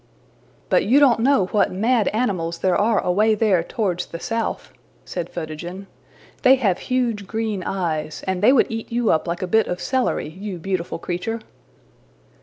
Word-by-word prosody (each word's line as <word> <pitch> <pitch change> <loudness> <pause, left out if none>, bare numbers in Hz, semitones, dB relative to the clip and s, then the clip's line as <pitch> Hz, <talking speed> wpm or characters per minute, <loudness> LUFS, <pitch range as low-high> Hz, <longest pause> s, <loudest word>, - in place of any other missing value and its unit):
'' - - -33
``But - - +3
you 270 +4 +6
don't 260 -6 +5
know 245 -5 +3
what 210 - +2
mad 225 +3 +1
animals 185 -8 -1
there 185 0 +1
are 215 0 +2
away 215 +5 +3
there 205 -5 +2
towards 180 -2 -2
the 170 - -7
south,'' 230 +3 -3 0.3
said 175 -2 -5
Photogen. 175 +4 -6 0.6
``They 265 +1 +6
have 200 -8 +1
huge 235 -6 -1
green 220 -3 -2
eyes, 165 -5 -3
and 190 -1 -2
they 215 - +6
would 265 - +3
eat 225 +1 -5
you 235 -1 +2
up 160 +2 +1
like 175 +3 -3
a - - -2
bit 220 -2 +4
of 180 - -3
celery, 250 - -1
you 190 +3 -6
beautiful 180 0 -3
creature!'' 180 +7 -3
200 Hz, 175 wpm, -22 LUFS, 175-225 Hz, 0.6 s, you